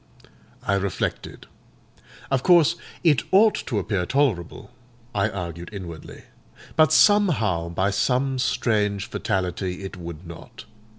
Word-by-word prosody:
I 100 - 0
reflected. 100 -1 -3 0.9
Of 135 -2 +2
course 170 -1 +5 0.3
it 150 -8 +4
ought 210 +3 +6
to 115 - -1
appear 95 -2 -1
tolerable, 125 - -1 0.4
I 105 +1 +1
argued 85 -3 -6
inwardly; 90 -6 -9 0.5
but 155 -2 +5
somehow, 120 - +3
by 95 +4 0
some 130 +6 0
strange 105 -5 0
fatality, 95 -1 -3
it 95 0 -7
would 85 0 -8
not. 85 0 -11
100 Hz, 115 wpm, -24 LUFS, 90-135 Hz, 0.9 s, ought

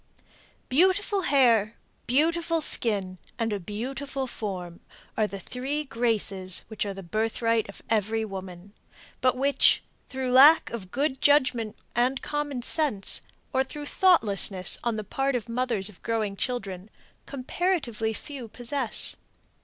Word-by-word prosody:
Beautiful 380 +7 +2
hair, 235 - +3 0.3
beautiful 330 +5 +2
skin 200 - 0 0.2
and 225 -2 -1
a 205 - -2
beautiful 265 +8 -4
form 185 -8 -6 0.4
are 215 - +1
the 200 -1 -7
three 265 +9 -3
graces 215 -7 +1
which 215 -2 -3
are 200 - -3
the 195 - -8
birthright 225 +3 0
of 200 - -11
every 220 0 0
woman, 190 -1 -9 0.5
but 255 0 +2
which, 275 +2 +3 0.3
through 260 -1 -3
lack 285 +6 +7
of 205 -6 -6
good 270 +3 -1
judgment 260 -7 +2 0.2
and 250 +3 +1
common 290 -4 -3
sense, 265 -10 +2 0.3
or 265 0 +3
through 295 +2 -8
thoughtlessness 205 - +2
on 235 -2 0
the 215 - -4
part 270 +6 -1
of 245 -1 -3
mothers 230 -4 0
of 210 -4 -7
growing 220 -3 -2
children, 195 -4 -4 0.4
comparatively 260 - -1
few 255 +2 -8
possess. 245 +2 0
235 Hz, 130 wpm, -26 LUFS, 205-275 Hz, 0.5 s, lack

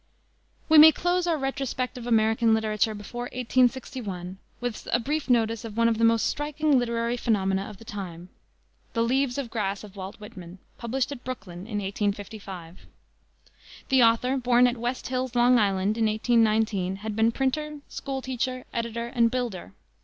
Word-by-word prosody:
We 315 -1 +7
may 315 +1 +11
close 355 +2 0
our 330 -2 +2
retrospect 270 -2 -3
of 245 -1 -7
American 225 0 +3
literature 215 0 0
before 240 +4 -6
1861 245 -7 -1 0.2
with 245 -3 -5
a 240 - +3
brief 290 +4 -2
notice 230 -2 +2
of 225 -1 -8
one 230 0 +4
of 225 -1 +1
the - - +1
most 230 -1 +4
striking 295 -1 +1
literary 235 0 -1
phenomena 195 -4 0
of 210 - -11
the 225 - -14
time 180 -4 -7 0.6
the 230 - +1
Leaves 260 +2 +1
of 260 -5 -4
Grass 200 -3 -2
of 205 -2 -12
Walt 190 0 -7
Whitman, 190 -5 -11 0.2
published 255 +3 -2
at 260 -4 -7
Brooklyn 195 -7 -7
in 210 -3 -3
1855. 200 -3 -5 1.0
The 265 -1 +5
author, 240 +3 +3
born 245 -1 +4
at 245 0 +1
West 245 +2 -3
Hills, 255 -1 -2
Long 245 0 +5
Island, 200 +1 +1
in 220 - +3
1819, 215 -4 +2
had 215 -1 -3
been 225 +1 +3
printer, 295 +4 -2
school 270 -1 -5
teacher, 255 0 -3
editor, 235 0 -3
and 235 -1 +2
builder. 235 - -4
230 Hz, 165 wpm, -26 LUFS, 210-255 Hz, 1.0 s, may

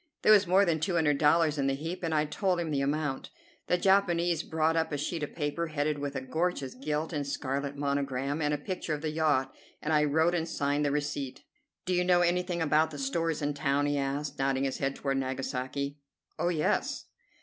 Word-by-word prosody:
There - - +6
was 205 -3 +6
more 190 +3 +5
than 165 -3 +1
two 175 +3 -1
hundred 150 -4 +2
dollars 155 0 +3
in 135 - +1
the 135 - +1
heap, 165 +6 -5
and 165 -2 -2
I 155 -1 +2
told 180 +4 0
him 165 -2 -2
the 140 -2 0
amount. 145 -1 -1 0.4
The 180 - +3
Japanese 175 -3 +3
brought 160 0 0
up 160 0 0
a 145 - -1
sheet 160 +3 -3
of 150 - -5
paper 165 +2 -2
headed 150 -1 -1
with 140 0 -4
a - - -2
gorgeous 140 0 -2
gilt 150 +5 -3
and 145 -2 -2
scarlet 140 +1 -3
monogram 140 0 -1
and 150 -1 +1
a 150 - +1
picture 160 +1 -3
of 150 - -9
the 155 - -1
yacht, 150 -4 +1 0.3
and 155 - -1
I 150 0 +4
wrote 160 +4 +2
and 165 -1 -1
signed 145 0 0
the 145 - +1
receipt. 145 -2 -3 0.4
"Do 185 - 0
you 180 0 +2
know 180 -1 +4
anything 175 0 +1
about 155 +1 +3
the 150 - -8
stores 155 +3 -1
in 145 0 0
town?" 145 0 +1
he 145 0 +1
asked, 140 +2 -3
nodding 135 0 +1
his 135 -1 -2
head 135 0 -1
toward 135 -1 -1
Nagasaki. 135 +2 -3 0.4
"Oh, 175 - +1
yes!" 160 -3 0
150 Hz, 215 wpm, -29 LUFS, 140-165 Hz, 0.4 s, There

